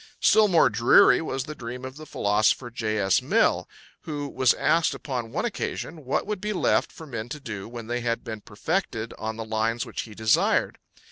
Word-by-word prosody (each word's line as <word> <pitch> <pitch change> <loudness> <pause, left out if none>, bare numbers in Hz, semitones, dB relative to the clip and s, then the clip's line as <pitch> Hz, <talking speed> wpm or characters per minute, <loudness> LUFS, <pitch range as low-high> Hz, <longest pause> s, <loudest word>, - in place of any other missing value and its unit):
Still 215 0 +5
more 170 -7 +5
dreary 115 +4 +5
was 135 -5 -3
the 155 - -7
dream 125 -1 -7
of 130 0 -8
the 155 +1 -11
philosopher 110 +4 +1
J. 110 -2 -2
S. 95 -2 +2
Mill, - - +2 0.3
who 145 -2 -4
was 130 -3 +2
asked 165 0 +2
upon 125 -5 -5
one 165 - -1
occasion 170 - -4
what 130 - 0
would 210 -2 -4
be 210 0 -2
left 185 - +1
for 160 - -11
men 120 -5 -6
to 150 - -6
do 105 -6 -7
when 120 -1 -8
they 120 +2 -2
had 115 -1 -1
been 110 -2 -6
perfected 115 - -3
on 110 0 -3
the 115 - -5
lines 110 +1 -1
which - - -5
he 110 -2 -11
desired. 110 +1 +2
120 Hz, 200 wpm, -25 LUFS, 110-155 Hz, 0.3 s, Still